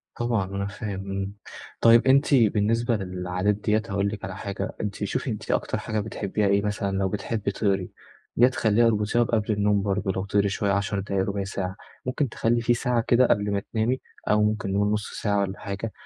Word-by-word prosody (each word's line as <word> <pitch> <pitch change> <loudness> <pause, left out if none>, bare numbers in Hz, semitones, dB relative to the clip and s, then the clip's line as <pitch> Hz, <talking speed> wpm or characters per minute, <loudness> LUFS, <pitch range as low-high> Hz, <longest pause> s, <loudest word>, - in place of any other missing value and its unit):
طبعًا 120 -4 0
أنا 100 0 -1
فاهم، 100 -1 -5
إمم. 95 0 -3 0.5
طيب 115 +2 +6
أنتِ 140 +2 +4
بالنسبة 115 +1 +2
للعادات 90 +1 -1
ديّة، 105 +1 +1
هاقول 100 0 0
لك 105 -1 -7
على 95 -1 -6
حاجة، 100 +1 -5
أنتِ 100 -2 -3
شوفي 100 +6 -2
أنتِ 110 0 -4
أكتر - - 0
حاجة 110 0 -2
بتحبيها 105 -1 -1
إيه؟ 100 0 +3
مثلًا، 100 -1 -2
لو 95 0 +1
بتحبي 105 +1 -2
تقري، 100 -3 -1 0.5
يا 120 - +7
تخلّيها 115 -2 +3
أربطيها 110 +2 +2
بقبل 110 -2 0
النوم 105 -1 +2
برضه 100 0 -1
لو 95 +1 -3
تقري 100 0 +2
شوية، 100 0 0
10 100 0 0
دقايق، 100 0 -1
0،25 100 0 -2
ساعة. 95 -1 -4 0.3
ممكن 130 +2 -1
تخلّي 115 +1 +1
في 120 +1 +3
ساعة 120 0 +1
كده 125 +1 +5
قبل 105 0 +1
ما 100 0 0
تنامي 115 +4 +1 0.3
أو 105 0 +4
ممكن 105 -2 0
نقول 100 +1 +2
0،5 105 -1 -3
ساعة 100 -1 +1
والّا 100 0 -3
حاجة، 100 +3 -4
105 Hz, 195 wpm, -25 LUFS, 100-115 Hz, 0.5 s, يا